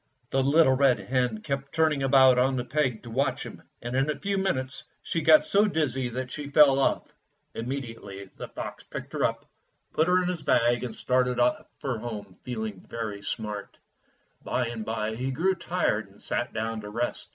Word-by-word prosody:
The 135 Hz, -, +2 dB
little 140 Hz, +1 st, +5 dB
red 130 Hz, -1 st, +4 dB
hen 125 Hz, -4 st, -1 dB
kept 140 Hz, 0 st, -3 dB
turning 155 Hz, -3 st, +2 dB
about 130 Hz, -2 st, +6 dB
on 130 Hz, +1 st, +3 dB
the 125 Hz, -1 st, -2 dB
peg 130 Hz, -4 st, 0 dB
to 120 Hz, -, -9 dB
watch 135 Hz, +5 st, 0 dB
him, -, -, -9 dB, 0.2 s
and 120 Hz, +1 st, -3 dB
in 135 Hz, +3 st, +2 dB
a 150 Hz, -, -1 dB
few 200 Hz, 0 st, -2 dB
minutes 135 Hz, -9 st, -1 dB, 0.2 s
she 165 Hz, -, -1 dB
got 155 Hz, 0 st, +6 dB
so 205 Hz, +2 st, +3 dB
dizzy 135 Hz, -, 0 dB
that 125 Hz, +1 st, -5 dB
she 145 Hz, -1 st, -6 dB
fell 140 Hz, -2 st, +6 dB
off. 135 Hz, -, 0 dB, 0.4 s
Immediately 115 Hz, -6 st, -6 dB
the -, -, -7 dB
fox -, -, -7 dB
picked -, -, -8 dB
her -, -, -1 dB
up, -, -, 0 dB, 0.5 s
put 160 Hz, -, +2 dB
her 180 Hz, -, +4 dB
Fairy -, -, -2 dB
Tale 180 Hz, 0 st, 0 dB
Foxes 150 Hz, -, -15 dB
5 -, -, +6 dB
in 115 Hz, -, +2 dB
his -, -, +4 dB
bag, -, -, -6 dB
and 120 Hz, -3 st, -4 dB
started 125 Hz, -1 st, +1 dB
for 130 Hz, -5 st, -3 dB
home 105 Hz, -4 st, -6 dB
feeling 110 Hz, -6 st, -5 dB
very 110 Hz, -3 st, -4 dB
smart. 105 Hz, 0 st, -4 dB, 0.7 s
By 125 Hz, -2 st, -1 dB
and 115 Hz, -2 st, -5 dB
by 110 Hz, 0 st, -2 dB
he 130 Hz, +3 st, -2 dB
grew 165 Hz, +9 st, +1 dB
tired 170 Hz, -, -1 dB
and 100 Hz, -, -20 dB
sat 120 Hz, +1 st, -2 dB
down 110 Hz, 0 st, -3 dB
to 105 Hz, -, -8 dB
rest. 120 Hz, +3 st, -3 dB
130 Hz, 205 wpm, -27 LUFS, 115-140 Hz, 0.7 s, about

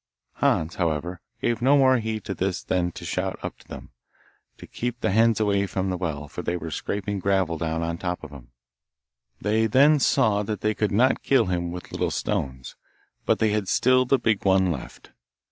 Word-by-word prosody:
Hans, 80 Hz, +2 st, +1 dB
however, 85 Hz, +1 st, -2 dB, 0.2 s
gave 120 Hz, -1 st, 0 dB
no 135 Hz, +4 st, +5 dB
more 130 Hz, -2 st, +4 dB
heed 110 Hz, -1 st, -4 dB
to 95 Hz, -, -4 dB
this 95 Hz, 0 st, -2 dB
than 90 Hz, -1 st, 0 dB
to -, -, -9 dB
shout -, -, -2 dB
up -, -, -6 dB
to -, -, -21 dB
them, -, -, -10 dB, 0.7 s
to -, -, -11 dB
keep 120 Hz, 0 st, -4 dB
the 110 Hz, -, 0 dB
hens 115 Hz, +1 st, +3 dB
away 100 Hz, -2 st, +1 dB
from 95 Hz, 0 st, -2 dB
the -, -, -1 dB
well, 75 Hz, -5 st, -4 dB
for -, -, -7 dB
they 90 Hz, -, -2 dB
were 80 Hz, -1 st, -6 dB
scraping 100 Hz, +3 st, -3 dB
gravel 95 Hz, -3 st, +1 dB
down 80 Hz, 0 st, -2 dB
on 85 Hz, 0 st, -2 dB
the -, -, -18 dB
top 90 Hz, -2 st, -3 dB
of 80 Hz, -, -9 dB
him. 65 Hz, -4 st, -12 dB, 0.9 s
They 110 Hz, +2 st, +1 dB
then 145 Hz, +7 st, +5 dB
saw 125 Hz, -8 st, +2 dB
that 105 Hz, -1 st, -4 dB
they 110 Hz, 0 st, +1 dB
could 105 Hz, 0 st, -1 dB
not 120 Hz, +6 st, +3 dB
kill 135 Hz, -, +3 dB
him 85 Hz, -2 st, -2 dB
with 90 Hz, 0 st, -8 dB
little -, -, -1 dB
stones, 65 Hz, -1 st, -3 dB, 0.5 s
but -, -, +3 dB
they 110 Hz, -1 st, +2 dB
had 105 Hz, -2 st, -1 dB
still 130 Hz, +4 st, +3 dB
the 135 Hz, +2 st, +3 dB
big 110 Hz, -4 st, 0 dB
one 95 Hz, -2 st, +3 dB
left. -, -, -8 dB
100 Hz, 205 wpm, -25 LUFS, 85-110 Hz, 0.9 s, no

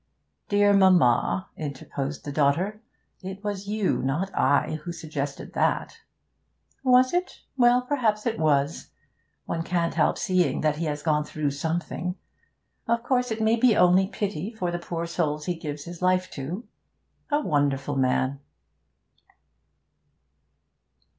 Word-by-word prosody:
'Dear 205 Hz, 0 st, +4 dB
mamma,' 125 Hz, -, +4 dB
interposed 140 Hz, -1 st, -5 dB
the 145 Hz, -, -4 dB
daughter, 165 Hz, +9 st, +1 dB, 0.4 s
'it 190 Hz, +1 st, -7 dB
was 200 Hz, -1 st, -4 dB
you, 210 Hz, -1 st, 0 dB
not 150 Hz, +9 st, -1 dB
I, 145 Hz, +3 st, +2 dB
who 175 Hz, -, -4 dB
suggested 150 Hz, -4 st, -5 dB
that.' 460 Hz, -, 0 dB, 0.8 s
'Was 255 Hz, +1 st, +5 dB
it? 360 Hz, +1 st, -2 dB
Well, 245 Hz, -1 st, +4 dB
perhaps 230 Hz, -6 st, 0 dB
it 230 Hz, -2 st, -1 dB
was. 145 Hz, -1 st, +1 dB, 0.6 s
One 165 Hz, -, -2 dB
can't 170 Hz, 0 st, -1 dB
help -, -, +2 dB
seeing 180 Hz, -7 st, +1 dB
that 150 Hz, -1 st, +1 dB
he 165 Hz, -, -2 dB
has 150 Hz, -1 st, -3 dB
gone 150 Hz, -2 st, +2 dB
through 150 Hz, -1 st, -2 dB
something. 170 Hz, +4 st, -3 dB, 0.7 s
Of 235 Hz, 0 st, +1 dB
course 250 Hz, -1 st, +1 dB
it 220 Hz, 0 st, -2 dB
may 220 Hz, +1 st, +3 dB
be 235 Hz, -2 st, +4 dB
only 180 Hz, +2 st, +5 dB
pity 200 Hz, -2 st, -3 dB
for 180 Hz, -5 st, -2 dB
the 175 Hz, -, -3 dB
poor 170 Hz, -1 st, -4 dB
souls 150 Hz, -3 st, -2 dB
he 180 Hz, -, 0 dB
gives 150 Hz, -3 st, -6 dB
his 175 Hz, +1 st, -9 dB
life 185 Hz, 0 st, +2 dB
to. 165 Hz, -, -6 dB, 0.6 s
A 290 Hz, 0 st, +2 dB
wonderful 145 Hz, -, 0 dB
man!' 130 Hz, +1 st, +1 dB
175 Hz, 135 wpm, -26 LUFS, 145-205 Hz, 0.8 s, Was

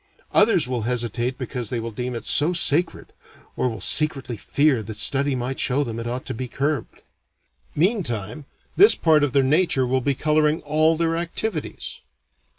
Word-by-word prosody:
Others 210 Hz, -, +3 dB
will 125 Hz, -2 st, -2 dB
hesitate 120 Hz, +1 st, -2 dB
because 125 Hz, -4 st, -4 dB
they 120 Hz, -, -2 dB
will 115 Hz, 0 st, -5 dB
deem 125 Hz, +3 st, -4 dB
it 115 Hz, -, -6 dB
so 155 Hz, +5 st, +3 dB
sacred, 170 Hz, -1 st, +1 dB, 0.4 s
or 125 Hz, -, 0 dB
will 110 Hz, -3 st, -7 dB
secretly 140 Hz, -1 st, +1 dB
fear 140 Hz, +3 st, +1 dB
that 110 Hz, 0 st, -8 dB
study 140 Hz, +4 st, +2 dB
might 125 Hz, +1 st, -4 dB
show 140 Hz, +3 st, +1 dB
them 115 Hz, -3 st, -5 dB
it 115 Hz, -, -5 dB
ought 125 Hz, +2 st, -4 dB
to -, -, -4 dB
be 125 Hz, +3 st, -5 dB
curbed. 140 Hz, +1 st, -3 dB, 0.7 s
Meantime, 145 Hz, -, -1 dB, 0.3 s
this 410 Hz, +3 st, +6 dB
part 155 Hz, -3 st, +3 dB
of 145 Hz, -, +1 dB
their 140 Hz, -, +3 dB
nature 145 Hz, -1 st, +2 dB
will 130 Hz, +1 st, 0 dB
be 140 Hz, +2 st, 0 dB
coloring 150 Hz, +2 st, +1 dB
all 155 Hz, +2 st, +2 dB
their 165 Hz, 0 st, 0 dB
activities. 170 Hz, +1 st, -4 dB
135 Hz, 170 wpm, -22 LUFS, 120-155 Hz, 0.7 s, this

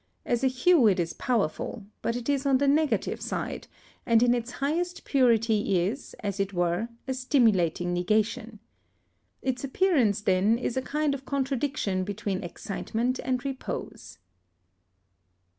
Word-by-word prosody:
As 240 Hz, +1 st, 0 dB
a -, -, +5 dB
hue 260 Hz, +1 st, +4 dB
it 190 Hz, -3 st, +3 dB
is 165 Hz, -1 st, -1 dB
powerful, 220 Hz, -1 st, -2 dB, 0.2 s
but 230 Hz, -, -1 dB
it 245 Hz, -1 st, -5 dB
is 280 Hz, -1 st, +1 dB
on 270 Hz, -1 st, +4 dB
the 280 Hz, +2 st, +1 dB
negative 300 Hz, +2 st, +1 dB
side, -, -, -4 dB, 0.4 s
and 230 Hz, 0 st, +4 dB
in 245 Hz, 0 st, +4 dB
its 240 Hz, 0 st, -3 dB
highest 330 Hz, +7 st, -2 dB
purity 225 Hz, -7 st, +3 dB
is, 250 Hz, +9 st, -5 dB
as 200 Hz, -2 st, -3 dB
it 195 Hz, 0 st, -1 dB
were, 175 Hz, +5 st, 0 dB, 0.2 s
a 260 Hz, -, 0 dB
stimulating 210 Hz, -, +2 dB
negation. 215 Hz, +5 st, 0 dB, 0.9 s
Its 260 Hz, -1 st, -2 dB
appearance, 270 Hz, -, +2 dB
then, 200 Hz, +3 st, +3 dB
is 240 Hz, -1 st, -3 dB
a 260 Hz, -, 0 dB
kind 295 Hz, +2 st, 0 dB
of 275 Hz, -1 st, -6 dB
contradiction 270 Hz, -8 st, -1 dB
between 200 Hz, -1 st, -3 dB
excitement 225 Hz, +7 st, -3 dB
and 255 Hz, 0 st, -1 dB
repose. 270 Hz, -1 st, -6 dB
240 Hz, 140 wpm, -27 LUFS, 205-270 Hz, 0.9 s, a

